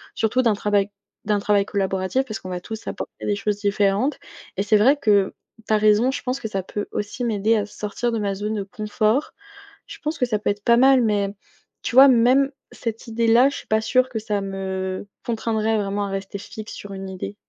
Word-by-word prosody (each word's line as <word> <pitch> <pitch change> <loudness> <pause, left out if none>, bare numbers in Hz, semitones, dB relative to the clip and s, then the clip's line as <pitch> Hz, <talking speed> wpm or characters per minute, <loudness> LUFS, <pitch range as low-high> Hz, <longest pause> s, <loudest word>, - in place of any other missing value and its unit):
surtout 225 +3 +1
d'un 230 -4 +3
travail 205 -1 +1 0.4
d'un 210 -1 +1
travail 205 0 +2
collaboratif, 195 +5 -1
parce 220 -4 -5
qu'on 185 - -8
va 180 -1 -3
tous 220 +4 -8
apporter - - -6
des 205 - +1
choses 205 0 -1
différentes. 205 +6 +1 0.4
Et 195 - +1
c'est 210 +1 +3
vrai 265 +8 +5
que, 205 -7 +2 0.3
tu 220 - +1
as - - +5
raison, 215 +4 +4
je - - -4
pense 255 +2 -3
que 220 - -4
ça 195 -2 -2
peut 205 +2 -5
aussi 210 +4 -4
m'aider 220 0 +2
à 210 - 0
sortir 210 +3 -3
de 225 - -1
ma 200 -1 -1
zone 210 +2 -3
de 200 - -2
confort. 215 +5 -1 0.5
Je - - -10
pense 305 +2 -2
que 250 - +2
ça 220 -4 0
peut 210 - -1
être 205 0 -2
pas 235 - +6
mal, 265 +1 +6
mais 205 -3 +1 0.5
tu 245 - -4
vois 270 +1 +10
même 255 +3 +4 0.2
cette 230 0 -5
idée-là, 230 +3 +4
je - - -7
suis - - -10
pas 220 - +2
sûre 255 +3 +2
que 225 -3 -3
ça 210 -2 -2
me 190 0 -4 0.2
contraindrait 220 -1 0
vraiment 200 0 -1
à - - -5
rester 195 +1 -5
fixe 215 +1 -9
sur 205 - -9
une 190 0 -6
idée. 190 +2 -6
210 Hz, 220 wpm, -22 LUFS, 200-235 Hz, 0.5 s, vois